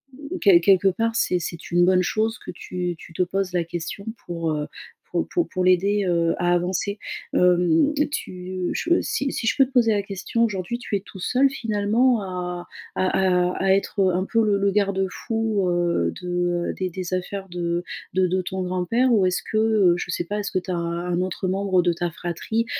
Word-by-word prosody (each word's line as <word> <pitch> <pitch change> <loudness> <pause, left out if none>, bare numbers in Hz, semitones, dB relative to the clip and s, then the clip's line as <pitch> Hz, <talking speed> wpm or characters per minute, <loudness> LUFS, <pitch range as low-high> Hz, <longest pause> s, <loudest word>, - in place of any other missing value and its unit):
mmh, 295 +6 -6
quel 180 -5 +6
quelque 195 +1 +4
part 225 +4 0
c'est 180 - +2
c'est 170 -1 -6
une 175 0 +4
bonne 185 0 +4
chose 220 +5 -1
que - - -12
tu 180 -1 -4
tu 165 - -13
te 180 - -1
poses 185 0 -1
la 175 -1 +1
question 170 +3 -5 0.2
pour, 165 -2 -3
heu, 150 -1 -2 0.5
pour - - 0
pour 345 - 0
pour 185 - -2
l'aider, 195 +3 +3
heu, 170 -1 +2
à 175 0 +2
avancer. 185 +3 -1 0.4
Hem, 180 - +3 0.2
tu 185 -5 -4
je 345 0 +2
si 275 0 -1
si 225 - -3
je - - +2
peux 270 - +6
te 265 - -15
poser 235 -3 +4
la 205 -1 +1
question, 200 +4 -2
aujourd'hui 210 +1 -1
tu 215 - -3
es - - +1
tout 195 0 -13
seul 260 +8 +3
finalement 225 0 +1
à 180 -2 -5 0.3
à 185 -1 +2
à - - 0
à 190 0 +4
être, 195 +1 0
heu, 185 -2 +3
un 185 +1 0
peu 225 -2 +3
le 200 -1 +2
le 200 0 +2
garde-fou, 200 +1 0
heu, 170 - +1
de, 180 - -7 0.4
heu, - - -2
des 185 -1 -3
des 185 0 -5
affaires 190 +1 -5
de 175 0 -2 0.3
de 185 0 +3
de 185 +1 0
ton 190 +1 -4
grand-père, 185 +8 +1
ou 205 -5 +4
est-ce 180 0 +1
que, 215 - -3
heu, 215 -5 +4
je 175 +1 -4
sais 175 - -2
pas, 205 +4 -3
est-ce 205 - -3
que 185 - +1
tu 185 - -12
as 180 - 0
un 170 +1 -2
autre 185 0 -2
membre 190 -1 +2
de 175 0 +2
ta 170 0 -2
fratrie, 175 +8 -2
185 Hz, 215 wpm, -23 LUFS, 175-210 Hz, 0.5 s, quel